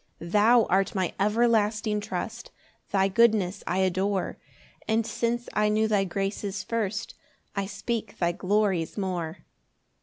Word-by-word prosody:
2 170 Hz, -, -8 dB
Thou 220 Hz, +5 st, +5 dB
art 195 Hz, +2 st, +1 dB
my 185 Hz, -2 st, 0 dB
everlasting 215 Hz, 0 st, +2 dB
trust, 210 Hz, +4 st, -5 dB, 0.4 s
Thy 195 Hz, -1 st, +3 dB
goodness 205 Hz, -2 st, +2 dB
I 180 Hz, -, 0 dB
adore; 190 Hz, +1 st, 0 dB, 0.5 s
And 225 Hz, 0 st, +2 dB
since 235 Hz, +1 st, -1 dB
I 210 Hz, 0 st, +2 dB
knew 215 Hz, +1 st, +2 dB
thy 205 Hz, -2 st, +2 dB
graces 195 Hz, +1 st, -3 dB
first 225 Hz, +1 st, -2 dB, 0.4 s
I 200 Hz, -1 st, -1 dB
speak 215 Hz, +3 st, -4 dB
thy 170 Hz, -1 st, +1 dB
glories 190 Hz, -1 st, 0 dB
more. 180 Hz, -5 st, -3 dB
205 Hz, 130 wpm, -27 LUFS, 190-220 Hz, 0.5 s, Thou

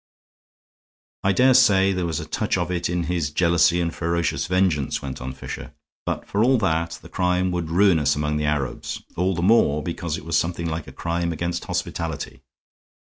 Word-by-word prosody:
"I 95 Hz, -, +3 dB
dare 130 Hz, +7 st, +5 dB
say 100 Hz, -6 st, +5 dB
there 90 Hz, -2 st, -1 dB
was 80 Hz, -1 st, -2 dB
a 80 Hz, -, -5 dB
touch 80 Hz, -, -1 dB
of 90 Hz, 0 st, -2 dB
it 85 Hz, -1 st, -1 dB
in 90 Hz, 0 st, -1 dB
his 85 Hz, -3 st, -1 dB
jealousy 85 Hz, +2 st, +3 dB
and 85 Hz, -1 st, -1 dB
ferocious 85 Hz, -1 st, -1 dB
vengeance," 90 Hz, -6 st, +1 dB
went 65 Hz, -2 st, -6 dB
on 65 Hz, +1 st, -4 dB
Fisher. 65 Hz, -, -8 dB, 0.3 s
"But, -, -, -2 dB
for 105 Hz, +2 st, +1 dB
all 130 Hz, +2 st, +4 dB
that, 85 Hz, -5 st, 0 dB
the -, -, -10 dB
crime 90 Hz, 0 st, 0 dB
would 85 Hz, -2 st, -2 dB
ruin 90 Hz, 0 st, +4 dB
us 75 Hz, -, +2 dB
among 75 Hz, 0 st, -1 dB
the 75 Hz, -, -1 dB
Arabs, 75 Hz, -3 st, -2 dB
all 90 Hz, +2 st, +1 dB
the 85 Hz, -, -2 dB
more 90 Hz, -8 st, +4 dB
because 85 Hz, -1 st, -3 dB
it 80 Hz, -, -10 dB
was 85 Hz, 0 st, -1 dB
something 85 Hz, +1 st, 0 dB
like 80 Hz, -1 st, -4 dB
a -, -, -9 dB
crime 85 Hz, 0 st, -2 dB
against 85 Hz, +1 st, -3 dB
hospitality. 80 Hz, -5 st, -4 dB
85 Hz, 195 wpm, -23 LUFS, 80-90 Hz, 0.3 s, dare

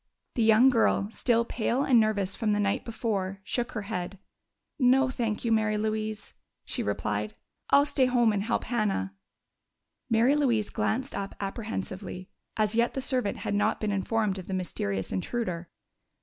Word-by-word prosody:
The 240 Hz, -, -1 dB
young 225 Hz, +4 st, +6 dB
girl, 225 Hz, -4 st, +2 dB
still 235 Hz, 0 st, +1 dB
pale 240 Hz, +3 st, 0 dB
and 250 Hz, -4 st, +5 dB
nervous 205 Hz, -3 st, +1 dB
from 215 Hz, -3 st, 0 dB
the 205 Hz, -, +1 dB
night 200 Hz, -1 st, 0 dB
before, 200 Hz, -4 st, -2 dB
shook 240 Hz, +4 st, -2 dB
her 220 Hz, -, -3 dB
head. 195 Hz, -2 st, -4 dB, 0.6 s
"No, 260 Hz, +1 st, +4 dB
thank 230 Hz, -3 st, -2 dB
you, 230 Hz, -, +1 dB
Mary 215 Hz, -1 st, +2 dB
Louise," 215 Hz, 0 st, -3 dB, 0.3 s
she -, -, -3 dB
replied. 105 Hz, +1 st, -2 dB, 0.3 s
"I'll 280 Hz, +1 st, +6 dB
stay 270 Hz, -3 st, +2 dB
home 240 Hz, -3 st, +3 dB
and 200 Hz, -, 0 dB
help 225 Hz, +4 st, -1 dB
Hannah." 210 Hz, -, -1 dB, 1.0 s
Mary 230 Hz, +5 st, +4 dB
Louise 240 Hz, -8 st, +1 dB
glanced 260 Hz, +5 st, -1 dB
up 200 Hz, 0 st, -4 dB
apprehensively. 195 Hz, -3 st, -5 dB, 0.3 s
As 215 Hz, -1 st, +1 dB
yet 235 Hz, +1 st, +1 dB
the -, -, -1 dB
servant 255 Hz, -6 st, 0 dB
had -, -, -1 dB
not 210 Hz, +2 st, +1 dB
been 215 Hz, -1 st, -1 dB
informed 200 Hz, 0 st, 0 dB
of 185 Hz, -, -9 dB
the 190 Hz, -, -2 dB
mysterious 100 Hz, -, -2 dB
intruder. 175 Hz, -, -3 dB
215 Hz, 165 wpm, -28 LUFS, 195-235 Hz, 1.0 s, young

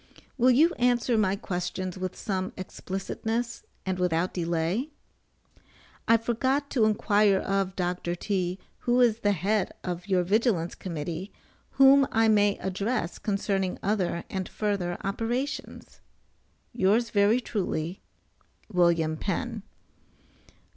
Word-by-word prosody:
Will 255 Hz, -1 st, +4 dB
you 310 Hz, +8 st, +5 dB
answer 245 Hz, -1 st, +2 dB
my 200 Hz, -3 st, +2 dB
questions 180 Hz, -1 st, -4 dB
with 185 Hz, -1 st, -4 dB
some 190 Hz, -3 st, -3 dB
explicitness, 220 Hz, +5 st, -4 dB, 0.2 s
and 185 Hz, -1 st, -2 dB
without 180 Hz, 0 st, +1 dB
delay? 170 Hz, -, -1 dB, 1.2 s
I 230 Hz, -, +6 dB
forgot 260 Hz, +5 st, -1 dB
to 230 Hz, -5 st, +3 dB
inquire 210 Hz, -2 st, +3 dB
of 195 Hz, -1 st, -1 dB
Dr. 175 Hz, -1 st, -2 dB
T. 180 Hz, -1 st, -2 dB, 0.2 s
who 245 Hz, +1 st, +1 dB
is 235 Hz, -3 st, +4 dB
the 205 Hz, -2 st, +2 dB
head 195 Hz, +3 st, 0 dB
of 180 Hz, +1 st, -4 dB
your 185 Hz, -2 st, +2 dB
Vigilance 195 Hz, -3 st, +1 dB
Committee, 170 Hz, +2 st, -5 dB, 0.4 s
whom 275 Hz, 0 st, +6 dB
I 225 Hz, 0 st, +3 dB
may 205 Hz, -1 st, +3 dB
address 190 Hz, 0 st, -2 dB
concerning 195 Hz, -2 st, -1 dB
other 190 Hz, -4 st, 0 dB
and 190 Hz, -1 st, -4 dB
further 195 Hz, -5 st, -2 dB
operations? 235 Hz, +8 st, -4 dB, 0.7 s
Yours 230 Hz, +2 st, +2 dB
very 205 Hz, +3 st, +4 dB
truly, 185 Hz, -6 st, -3 dB, 0.7 s
WM. 170 Hz, -3 st, +2 dB
PENN. 220 Hz, +6 st, -3 dB
195 Hz, 115 wpm, -27 LUFS, 180-230 Hz, 1.2 s, I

